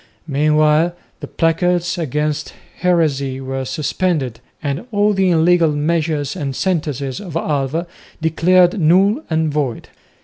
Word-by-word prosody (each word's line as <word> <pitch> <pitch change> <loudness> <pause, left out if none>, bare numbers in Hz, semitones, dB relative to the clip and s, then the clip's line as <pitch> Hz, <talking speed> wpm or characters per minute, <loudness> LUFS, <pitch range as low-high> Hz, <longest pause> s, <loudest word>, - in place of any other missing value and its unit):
Meanwhile 155 +3 +2 0.2
the - - -7
placards 175 +2 +1
against 150 0 -2 0.3
heresy 145 -7 +1
were 135 0 -4
suspended, 140 -2 -1 0.2
and 145 - -3
all 205 0 +2
the 190 -1 +2
illegal 165 -1 +3
measures 150 -1 -1
and 140 -2 -4
sentences 150 -8 -2
of 180 -6 -8
Alva 150 +1 -1 0.3
declared 175 +4 +3
null 190 - +3
and 160 -2 0
void. 140 -6 -2
160 Hz, 115 wpm, -18 LUFS, 145-175 Hz, 0.3 s, illegal